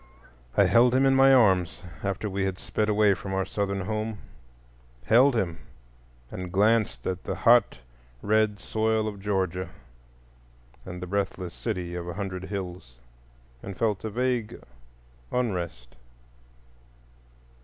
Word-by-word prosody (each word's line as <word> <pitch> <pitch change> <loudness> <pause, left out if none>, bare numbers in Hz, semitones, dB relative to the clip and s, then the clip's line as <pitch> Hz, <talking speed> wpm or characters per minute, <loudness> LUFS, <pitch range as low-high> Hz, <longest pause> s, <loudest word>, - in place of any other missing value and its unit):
I - - +7
held 120 +1 +4
him 135 +1 +4
in 135 - +4
my 135 0 +6
arms, 95 -9 +3 0.2
after 100 +2 -2
we 100 -1 -2
had 95 -1 -2
sped 105 +2 -2
far - - +2
away 105 -1 +4
from 95 0 -5
our 95 0 0
Southern 100 0 -2
home,—held 65 - -1
him, 85 -7 -1 0.7
and 90 -1 -6
glanced 105 - +2
at 95 0 -3
the - - -3
hot 120 -2 +4 0.5
red 110 0 +2
soil 110 +2 0
of 105 -2 -5
Georgia 95 -3 -1 1.2
and 90 0 -7
the - - -3
breathless 95 -2 -3
city 90 -6 -4
of 90 0 -5
a 85 - -5
hundred 95 -2 -4
hills, 90 -10 -6 0.7
and 100 -1 -8
felt 105 -4 0
a 110 - -2
vague 125 0 -1 0.7
unrest. 85 - -3
100 Hz, 135 wpm, -26 LUFS, 90-110 Hz, 1.2 s, I